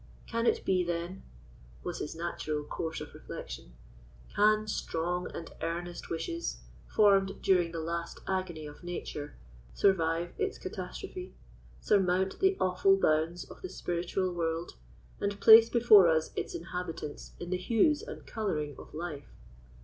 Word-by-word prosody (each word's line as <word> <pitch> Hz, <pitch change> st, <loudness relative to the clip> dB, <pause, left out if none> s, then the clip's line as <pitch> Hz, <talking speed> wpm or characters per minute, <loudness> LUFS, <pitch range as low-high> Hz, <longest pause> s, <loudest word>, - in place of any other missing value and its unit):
Can 230 Hz, 0 st, -1 dB
it -, -, +2 dB
be, 185 Hz, -1 st, +3 dB
then," 175 Hz, +2 st, -3 dB, 0.6 s
was -, -, -4 dB
his 150 Hz, -, -4 dB
natural 155 Hz, -3 st, -3 dB
course 160 Hz, +2 st, -4 dB
of -, -, -8 dB
reflection—"can -, -, -2 dB
strong 180 Hz, -2 st, -2 dB
and 165 Hz, -, -7 dB
earnest 170 Hz, +1 st, -4 dB
wishes, 335 Hz, -, -3 dB, 0.3 s
formed 195 Hz, -2 st, +4 dB
during 180 Hz, -3 st, +3 dB
the 165 Hz, -, -4 dB
last 170 Hz, +1 st, -4 dB
agony 185 Hz, -5 st, -2 dB
of 150 Hz, +3 st, -11 dB
nature, 155 Hz, -4 st, -5 dB, 0.4 s
survive 170 Hz, -3 st, +2 dB
its 400 Hz, 0 st, -1 dB
catastrophe, 365 Hz, 0 st, -7 dB, 0.5 s
surmount 190 Hz, -1 st, +2 dB
the 385 Hz, 0 st, +3 dB
awful 185 Hz, +1 st, +4 dB
bounds 165 Hz, 0 st, +1 dB
of -, -, -13 dB
the 185 Hz, -, -5 dB
spiritual 180 Hz, +1 st, -2 dB
world, 165 Hz, 0 st, -2 dB, 0.5 s
and 200 Hz, 0 st, -2 dB
place 225 Hz, +1 st, +9 dB
before 225 Hz, -6 st, +7 dB
us 160 Hz, -1 st, +2 dB
its -, -, -3 dB
inhabitants 170 Hz, -3 st, -6 dB
in 175 Hz, +1 st, -6 dB
the 185 Hz, -, +1 dB
hues 230 Hz, -, +3 dB
and 475 Hz, +2 st, -9 dB
colouring 155 Hz, -10 st, -2 dB
of -, -, -12 dB
life? 155 Hz, -4 st, -6 dB
175 Hz, 135 wpm, -31 LUFS, 165-195 Hz, 0.6 s, place